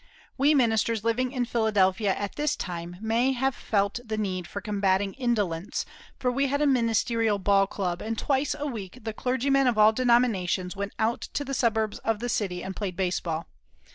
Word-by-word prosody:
We 285 Hz, +3 st, +4 dB
ministers 225 Hz, -3 st, +2 dB
living 245 Hz, +2 st, 0 dB
in 250 Hz, -3 st, -1 dB
Philadelphia 210 Hz, -4 st, +2 dB
at 205 Hz, -1 st, -4 dB
this 295 Hz, 0 st, 0 dB
time 175 Hz, -1 st, -6 dB
may 230 Hz, +4 st, +2 dB
have 265 Hz, +1 st, 0 dB
felt 200 Hz, 0 st, 0 dB
the 220 Hz, -2 st, -4 dB
need 185 Hz, -4 st, -2 dB
for 200 Hz, -, -5 dB
combating 195 Hz, -1 st, 0 dB
indolence, 205 Hz, -8 st, -1 dB, 0.3 s
for 250 Hz, -, 0 dB
we 275 Hz, +2 st, +1 dB
had 285 Hz, +2 st, 0 dB
a 300 Hz, -, +2 dB
ministerial 230 Hz, -4 st, +2 dB
ball 195 Hz, 0 st, +3 dB
club, 180 Hz, -3 st, -3 dB
and 225 Hz, +1 st, -3 dB
twice 280 Hz, +3 st, 0 dB
a 295 Hz, -, -3 dB
week 220 Hz, -7 st, -6 dB
the 220 Hz, -1 st, -4 dB
clergymen 260 Hz, +3 st, +1 dB
of 240 Hz, -3 st, +2 dB
all 215 Hz, +1 st, +6 dB
denominations 220 Hz, -7 st, +2 dB
went 200 Hz, +1 st, -4 dB
out 225 Hz, +2 st, 0 dB
to 285 Hz, -, -1 dB
the 275 Hz, -, -4 dB
suburbs 220 Hz, -4 st, 0 dB
of 225 Hz, -1 st, 0 dB
the 240 Hz, +3 st, -4 dB
city 180 Hz, -6 st, -1 dB
and 190 Hz, 0 st, -5 dB
played 190 Hz, -3 st, -4 dB
baseball. 175 Hz, -3 st, -2 dB
220 Hz, 185 wpm, -27 LUFS, 195-250 Hz, 0.3 s, all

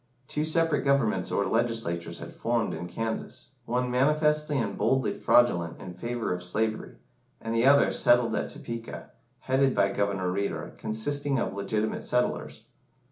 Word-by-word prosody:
Two 150 Hz, -, -2 dB
separate 160 Hz, 0 st, +1 dB
governments 125 Hz, -9 st, +1 dB
or 100 Hz, -, +1 dB
legislatures 115 Hz, -8 st, -1 dB
had -, -, -9 dB
formed -, -, -1 dB
in 85 Hz, -, -5 dB
Kansas, 115 Hz, +5 st, -5 dB
one 125 Hz, +1 st, -1 dB
manifestly 150 Hz, +3 st, +2 dB
and 105 Hz, -6 st, -1 dB
boldly 130 Hz, -2 st, +1 dB
fraudulent 85 Hz, -9 st, +2 dB
in 90 Hz, -, -8 dB
favour 120 Hz, +1 st, -3 dB
of 90 Hz, -, -5 dB
slavery, 110 Hz, +5 st, -2 dB, 0.4 s
and 115 Hz, 0 st, -4 dB
the 115 Hz, +3 st, +3 dB
other 140 Hz, +1 st, +6 dB
settled 120 Hz, -2 st, +4 dB
at -, -, -2 dB
Topeka, 115 Hz, -6 st, -7 dB, 0.3 s
headed 130 Hz, 0 st, +2 dB
by 100 Hz, -1 st, +3 dB
Governor 100 Hz, -3 st, -1 dB
Reeder, 100 Hz, +2 st, -3 dB
consisting 135 Hz, +6 st, -2 dB
of 105 Hz, -, -1 dB
legitimate 105 Hz, +2 st, -2 dB
settlers. 125 Hz, 0 st, -1 dB
115 Hz, 145 wpm, -27 LUFS, 100-135 Hz, 0.4 s, other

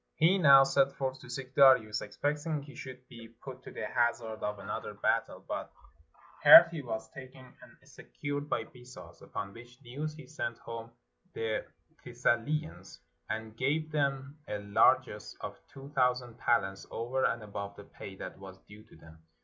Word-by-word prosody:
He 180 Hz, +5 st, +4 dB
now 140 Hz, -5 st, +8 dB
set 135 Hz, 0 st, +3 dB
forth 135 Hz, -1 st, -3 dB
to 125 Hz, -, -13 dB
seek 130 Hz, +1 st, -6 dB
Darius, 130 Hz, -7 st, +5 dB
expecting 145 Hz, +7 st, -2 dB
he 145 Hz, 0 st, -12 dB
should 130 Hz, 0 st, -10 dB
be 115 Hz, -1 st, -12 dB
put 130 Hz, +3 st, -11 dB
to -, -, -11 dB
the -, -, -5 dB
hazard 120 Hz, -2 st, -1 dB
of 105 Hz, 0 st, -2 dB
another 100 Hz, -, -6 dB
battle, -, -, -1 dB
but -, -, -4 dB, 0.7 s
heard -, -, +11 dB
he 165 Hz, -3 st, -5 dB
was 110 Hz, -4 st, -5 dB
taken 130 Hz, -1 st, -12 dB
and -, -, -16 dB
secured 145 Hz, -, -6 dB
by -, -, 0 dB
Bessus, 125 Hz, +2 st, -14 dB
upon 100 Hz, -, -6 dB
which 120 Hz, +2 st, -14 dB
news 145 Hz, +5 st, -5 dB
he 155 Hz, -, -11 dB
sent 120 Hz, -7 st, -4 dB
home 115 Hz, 0 st, -8 dB, 0.4 s
the 110 Hz, -1 st, -2 dB, 0.4 s
Thessalians, 150 Hz, +7 st, -1 dB, 0.3 s
and 110 Hz, 0 st, -4 dB
gave 150 Hz, +6 st, -1 dB
them 140 Hz, -1 st, -1 dB
a 105 Hz, -, -3 dB
largess 100 Hz, 0 st, +2 dB
of -, -, -7 dB
two 135 Hz, +1 st, -11 dB
thousand 125 Hz, -4 st, 0 dB
talents 95 Hz, -5 st, 0 dB
over 125 Hz, +3 st, -2 dB
and 115 Hz, -1 st, 0 dB
above 100 Hz, -1 st, -6 dB
the 100 Hz, -, -11 dB
pay 100 Hz, -1 st, -10 dB
that -, -, -8 dB
was 95 Hz, -1 st, -11 dB
due 105 Hz, +1 st, -13 dB
to -, -, -19 dB
them. 80 Hz, 0 st, -16 dB
125 Hz, 165 wpm, -31 LUFS, 110-140 Hz, 0.7 s, heard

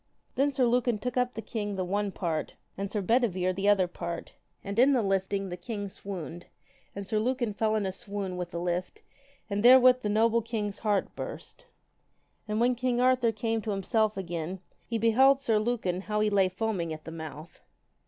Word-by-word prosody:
Then 280 Hz, +2 st, +2 dB
Sir 265 Hz, -2 st, +2 dB
Lucan 240 Hz, -1 st, +2 dB
took 250 Hz, +4 st, -4 dB
up 250 Hz, 0 st, 0 dB
the 225 Hz, -, -5 dB
king 205 Hz, -3 st, -3 dB
the 185 Hz, -1 st, -2 dB
one 200 Hz, +2 st, -1 dB
part, 165 Hz, -5 st, -3 dB, 0.2 s
and 200 Hz, 0 st, -4 dB
Sir 210 Hz, -1 st, -2 dB
Bedivere 185 Hz, -5 st, +2 dB
the 195 Hz, +2 st, +1 dB
other 195 Hz, -3 st, +4 dB
part, 170 Hz, -1 st, -6 dB, 0.3 s
and 200 Hz, +3 st, -3 dB
in 270 Hz, +3 st, +6 dB
the 250 Hz, -, +3 dB
lifting, 195 Hz, 0 st, 0 dB
the 180 Hz, -, -5 dB
king 205 Hz, +3 st, -5 dB
swooned, 175 Hz, -3 st, -7 dB, 0.5 s
and 200 Hz, 0 st, -5 dB
Sir 215 Hz, +2 st, 0 dB
Lucan 240 Hz, -1 st, -1 dB
fell 220 Hz, +1 st, +1 dB
in 210 Hz, -2 st, 0 dB
a 190 Hz, -, -1 dB
swoon 200 Hz, -2 st, -5 dB
with 180 Hz, -1 st, -4 dB
the 170 Hz, -, -5 dB
lift 175 Hz, +1 st, -3 dB, 0.4 s
and 205 Hz, -1 st, -2 dB
therewith 255 Hz, +1 st, +7 dB
the 210 Hz, -, -2 dB
noble 225 Hz, +2 st, +3 dB
knight's 210 Hz, -3 st, -2 dB
heart 210 Hz, -3 st, 0 dB
burst. -, -, -8 dB, 0.8 s
And 210 Hz, +1 st, -1 dB
when 245 Hz, +2 st, +3 dB
king 245 Hz, 0 st, 0 dB
Arthur 250 Hz, -2 st, +3 dB
came 225 Hz, +1 st, -1 dB
to 215 Hz, -, -5 dB
himself 210 Hz, +2 st, 0 dB
again, 175 Hz, 0 st, -4 dB, 0.3 s
he 230 Hz, -, -1 dB
beheld 260 Hz, +5 st, +5 dB
Sir 225 Hz, -5 st, +2 dB
Lucan 215 Hz, -6 st, -1 dB
how 210 Hz, +1 st, -2 dB
he 210 Hz, 0 st, +2 dB
lay 195 Hz, -2 st, +3 dB
foaming 185 Hz, -4 st, -2 dB
at 155 Hz, 0 st, -7 dB
the 160 Hz, -, -8 dB
mouth. 160 Hz, 0 st, -9 dB
210 Hz, 195 wpm, -28 LUFS, 185-235 Hz, 0.8 s, therewith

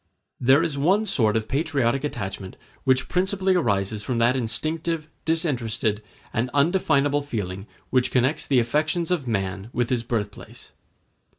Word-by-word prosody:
There 135 Hz, +6 st, +5 dB
is 150 Hz, -4 st, -2 dB
one 190 Hz, +9 st, +3 dB
sort 110 Hz, -, +2 dB
of 110 Hz, -, -3 dB
patriotic 135 Hz, -3 st, 0 dB
attachment 95 Hz, -8 st, -5 dB, 0.3 s
which 130 Hz, -1 st, +3 dB
principally 190 Hz, +1 st, +1 dB
arises 105 Hz, -, 0 dB
from 125 Hz, +1 st, -2 dB
that 120 Hz, +2 st, +3 dB
instinctive, 155 Hz, +7 st, -2 dB, 0.2 s
disinterested, 120 Hz, -10 st, 0 dB, 0.3 s
and 115 Hz, +2 st, 0 dB
undefinable 145 Hz, -2 st, +2 dB
feeling 100 Hz, -7 st, -5 dB, 0.2 s
which 130 Hz, -1 st, +3 dB
connects 130 Hz, +5 st, +1 dB
the 135 Hz, -3 st, +4 dB
affections 155 Hz, +8 st, 0 dB
of 155 Hz, -8 st, 0 dB
man 95 Hz, -1 st, -2 dB
with 120 Hz, +1 st, -1 dB
his 125 Hz, -2 st, +1 dB
birthplace. 110 Hz, -3 st, -5 dB
130 Hz, 135 wpm, -24 LUFS, 110-155 Hz, 0.3 s, There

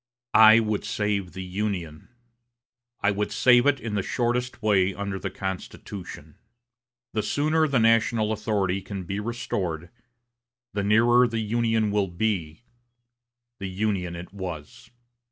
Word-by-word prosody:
"I 110 Hz, +1 st, +9 dB
would 110 Hz, -2 st, -1 dB
save 100 Hz, -3 st, -2 dB
the 95 Hz, 0 st, -6 dB
Union. 90 Hz, -5 st, -4 dB, 0.9 s
I 105 Hz, -, +3 dB
would 105 Hz, +1 st, -2 dB
save 125 Hz, 0 st, +5 dB
it 145 Hz, -, +5 dB
the 105 Hz, -2 st, -1 dB
shortest 120 Hz, +3 st, -2 dB
way 100 Hz, -3 st, +3 dB
under 100 Hz, -1 st, -4 dB
the 95 Hz, -, -3 dB
Constitution. 95 Hz, 0 st, -7 dB, 0.7 s
The 110 Hz, -, 0 dB
sooner 155 Hz, +7 st, +1 dB
the 140 Hz, -3 st, +1 dB
national 115 Hz, -1 st, +3 dB
authority 100 Hz, -3 st, -1 dB
can 95 Hz, 0 st, -6 dB
be 100 Hz, +4 st, -4 dB
restored, 100 Hz, -8 st, -3 dB, 0.8 s
the 100 Hz, -, -1 dB
nearer 120 Hz, +4 st, +5 dB
the 115 Hz, -1 st, -3 dB
Union 110 Hz, -1 st, +1 dB
will 100 Hz, -1 st, +1 dB
be 90 Hz, 0 st, -2 dB, 1.0 s
'the 95 Hz, -, -4 dB
Union 95 Hz, -3 st, -2 dB
as 85 Hz, +1 st, -7 dB
it -, -, -24 dB
was.' 90 Hz, -7 st, -8 dB
105 Hz, 135 wpm, -25 LUFS, 95-115 Hz, 1.0 s, I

